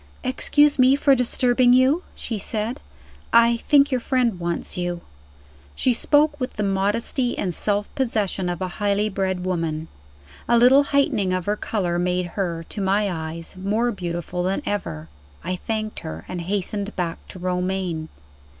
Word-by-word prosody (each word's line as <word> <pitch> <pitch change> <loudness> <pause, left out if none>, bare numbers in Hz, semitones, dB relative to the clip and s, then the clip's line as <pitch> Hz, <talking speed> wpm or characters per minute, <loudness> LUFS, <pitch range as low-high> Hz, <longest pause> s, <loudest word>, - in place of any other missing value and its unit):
"Excuse 290 +2 +2
me 255 +2 +6
for 280 0 +4
disturbing 250 0 +3
you," 260 +6 +4
she 225 -4 -4
said; 220 +6 -3 0.5
"I 235 0 +5
think 285 +3 +3
your 255 - +1
friend 240 -6 0
wants 170 0 -3
you." 175 -1 -3 0.7
She 255 - +2
spoke 295 +4 +2
with 255 0 -3
the 210 - -2
modesty 205 +6 0
and 180 -3 -2
self 205 +3 0
possession 210 -8 -1
of 175 +1 -3
a - - -1
highly 205 +1 +1
bred 190 -2 -2
woman. 165 -3 -2 0.6
A 235 - +5
little 260 +4 +6
heightening 245 -10 +1
of 185 -2 -2
her 205 - +1
color 180 -5 -2
made 180 0 0
her, 170 -4 -2
to 205 - -5
my 195 +1 +1
eyes, 160 0 -5
more 210 +6 0
beautiful 175 -2 -4
than 185 +2 -1
ever. 80 - -3 0.4
I 180 +3 -2
thanked 215 +3 -4
her, 80 +1 -7
and 180 -1 -5
hastened 200 +3 -3
back 170 -2 -2
to - - -10
Romayne. 180 -2 -2
200 Hz, 160 wpm, -23 LUFS, 180-240 Hz, 0.7 s, me